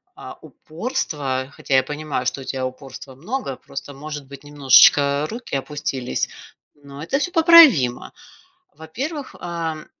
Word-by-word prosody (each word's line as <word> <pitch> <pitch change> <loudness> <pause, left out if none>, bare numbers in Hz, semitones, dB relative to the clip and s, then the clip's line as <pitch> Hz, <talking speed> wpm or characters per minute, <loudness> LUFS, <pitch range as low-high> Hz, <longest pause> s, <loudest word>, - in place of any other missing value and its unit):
а, - - -11
упорство, 145 - -4
хотя 135 - -2
я 130 - +4
понимаю, 150 +2 -4
что 135 - -2
у - - -8
тебя 130 0 -4
упорства 130 0 -9
много, 170 - -5
просто 140 +1 -9
может 150 +1 -8
быть 140 +1 -12
немножечко 145 0 +4
руки 235 - -6
опустились, 135 -2 -3 0.5
но 140 -1 -13
это 220 - -1
всё 355 - -2
поправимо. 320 - +6 0.6
Во-первых, 265 - -6
ам, 165 -3 -5
145 Hz, 130 wpm, -21 LUFS, 135-170 Hz, 0.6 s, поправимо